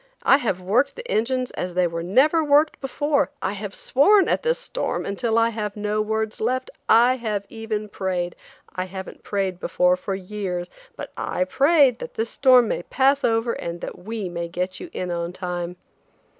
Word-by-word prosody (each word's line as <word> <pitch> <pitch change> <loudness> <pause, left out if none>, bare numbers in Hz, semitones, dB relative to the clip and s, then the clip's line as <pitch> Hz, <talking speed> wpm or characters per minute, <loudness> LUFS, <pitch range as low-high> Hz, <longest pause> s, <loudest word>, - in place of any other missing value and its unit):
I 275 - +6
have 225 -9 -1
worked 230 +10 +1
the 485 0 -8
engines 255 - 0
as 180 -1 -5
they 180 0 +3
never 200 - +2
were 295 - -5
worked 295 +2 +4
before; 285 +1 0
I 190 - -2
have 205 0 -6
sworn 390 +9 +4
at - - +1
this 485 +1 +1
storm - - -3
until 225 +3 -1
I 230 0 +4
have 210 -2 -4
no 210 +1 0
words 220 0 -2
left; 255 +3 -1 0.2
I 240 +3 +6
have 210 -4 -3
even 220 -2 -4
prayed–I 185 -1 -5
haven't 190 0 -8
prayed 190 -3 -2
before 180 0 +2
for 190 +1 -4
years–but 190 - -6
I 180 - -1
prayed 275 - +4
that - - -8
this 225 +1 -2
storm 255 -4 +5
may - - -1
pass 275 +8 +2
over 225 +1 +1
and 170 0 -5
that - - -7
we 215 +1 -4
may 170 -1 -4
get 180 +2 -3
you 360 - -8
in 180 - -4
on 170 0 -3
time." 180 -1 -4
215 Hz, 180 wpm, -23 LUFS, 185-255 Hz, 0.2 s, I